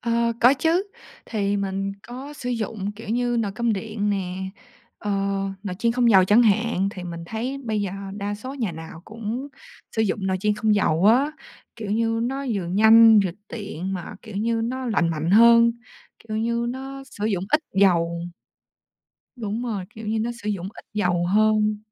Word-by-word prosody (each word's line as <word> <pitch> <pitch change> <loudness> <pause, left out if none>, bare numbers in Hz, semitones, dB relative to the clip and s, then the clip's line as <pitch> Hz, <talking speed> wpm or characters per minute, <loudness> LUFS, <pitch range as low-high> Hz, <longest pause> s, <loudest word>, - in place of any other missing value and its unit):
Ờ, 235 0 +1
có 250 +4 +7
chứ! 330 +6 +1 0.4
Thì 205 -2 -1
mình 195 0 -2
có 260 +4 -8
sử 250 -3 -5
dụng, 215 -3 -3
kiểu 210 0 -11
như, 240 +1 0
nồi 205 -3 -2
cơm 235 +2 0
điện 210 0 -2
nè, 190 -1 -3 0.6
ờ, 210 - -4 0.5
nồi 185 -3 -4
chiên 230 0 +2
không 240 -1 +3
dầu, 190 -3 +7
chẳng 210 +6 +5
hạn. 220 -2 +2
Thì 180 -2 -8
mình 170 -1 -6
thấy 245 +6 -3
bây 215 -2 -1
giờ 200 -2 -2 0.3
đa 205 0 -3
số 255 +6 -7
nhà 225 -10 -2
nào 160 0 -9
cũng 230 +5 -5 0.5
sử 220 - +3
dụng 205 -2 -1
nồi 190 - +1
chiên 210 0 +1
không 215 0 +2
dầu 185 -2 +2
á. 265 +7 +4 0.4
Kiểu 215 -3 -5
như, 225 +1 +1
nó 270 +3 -2
vừa 190 -3 -2
nhanh, 220 +3 +7
vừa 185 - 0 0.2
tiện 195 -4 -5
mà, 180 -3 -5
kiểu 220 -4 -9
như, 230 +2 0
nó 255 +2 -3
lành 195 -7 +1
mạnh 160 +1 -2
hơn, 235 +2 +7 0.6
kiểu 215 - -2
như, 235 +1 0
nó 270 +2 -6
sử 210 - -5
dụng 190 -4 -1
ít 300 - +4
dầu. 170 -3 +3 1.1
Đúng 225 -1 -3
rồi, 210 -6 -3
kiểu 220 0 -9
như, 220 +1 0
nó 235 +2 -1
sử 210 - -2
dụng 190 -3 -3
ít - - -13
dầu 180 -4 +1
hơn. 215 +2 +3
215 Hz, 190 wpm, -24 LUFS, 195-235 Hz, 1.1 s, có